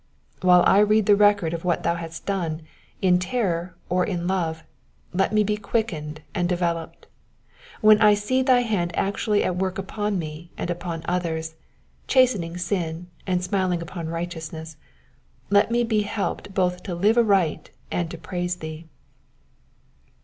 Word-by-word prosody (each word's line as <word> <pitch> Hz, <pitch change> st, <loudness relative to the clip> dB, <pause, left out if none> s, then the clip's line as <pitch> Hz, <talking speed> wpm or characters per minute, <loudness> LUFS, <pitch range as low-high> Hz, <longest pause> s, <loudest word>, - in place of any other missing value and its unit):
While 180 Hz, -1 st, +6 dB
I 195 Hz, -, +6 dB
read 210 Hz, 0 st, +4 dB
the 205 Hz, -, +6 dB
record 200 Hz, -5 st, +3 dB
of 165 Hz, -, -4 dB
what 175 Hz, -2 st, 0 dB
thou -, -, +2 dB
hast 165 Hz, -1 st, -7 dB
done, 170 Hz, -5 st, -2 dB, 0.4 s
in 180 Hz, -1 st, +4 dB
terror 180 Hz, -3 st, -1 dB
or 180 Hz, 0 st, +1 dB
in 175 Hz, -3 st, -2 dB
love, 165 Hz, -4 st, -1 dB, 0.5 s
let 190 Hz, +2 st, +1 dB
me 215 Hz, 0 st, +3 dB
be 210 Hz, +1 st, 0 dB
quickened 170 Hz, -8 st, -3 dB
and 175 Hz, -3 st, 0 dB
developed. 170 Hz, -2 st, -2 dB, 0.8 s
While 215 Hz, 0 st, +6 dB
I 210 Hz, -1 st, +7 dB
see 215 Hz, +6 st, 0 dB
thy 255 Hz, -2 st, +4 dB
hand 185 Hz, -8 st, -1 dB
actually 205 Hz, +1 st, +1 dB
at 180 Hz, -, -1 dB
work 185 Hz, 0 st, -1 dB
upon 205 Hz, +1 st, -2 dB
me, 160 Hz, 0 st, -6 dB
and 175 Hz, -, -2 dB
upon 170 Hz, -2 st, -5 dB
others, 160 Hz, -2 st, -2 dB, 0.5 s
chastening 210 Hz, -10 st, +2 dB
sin, 175 Hz, -2 st, -3 dB, 0.2 s
and 180 Hz, -1 st, 0 dB
smiling 185 Hz, -2 st, 0 dB
upon 170 Hz, -1 st, -6 dB
righteousness, 160 Hz, -1 st, -5 dB, 0.8 s
let 200 Hz, +1 st, +5 dB
me 240 Hz, +1 st, +2 dB
be 220 Hz, -2 st, +1 dB
helped 205 Hz, -1 st, -3 dB
both 180 Hz, -1 st, +1 dB
to 180 Hz, -2 st, -5 dB
live 205 Hz, +6 st, +3 dB
aright 195 Hz, -8 st, +2 dB, 0.2 s
and 175 Hz, -2 st, -1 dB
to 170 Hz, -, -7 dB
praise 180 Hz, +1 st, -3 dB
thee. 160 Hz, -1 st, -8 dB
180 Hz, 155 wpm, -24 LUFS, 170-205 Hz, 0.8 s, I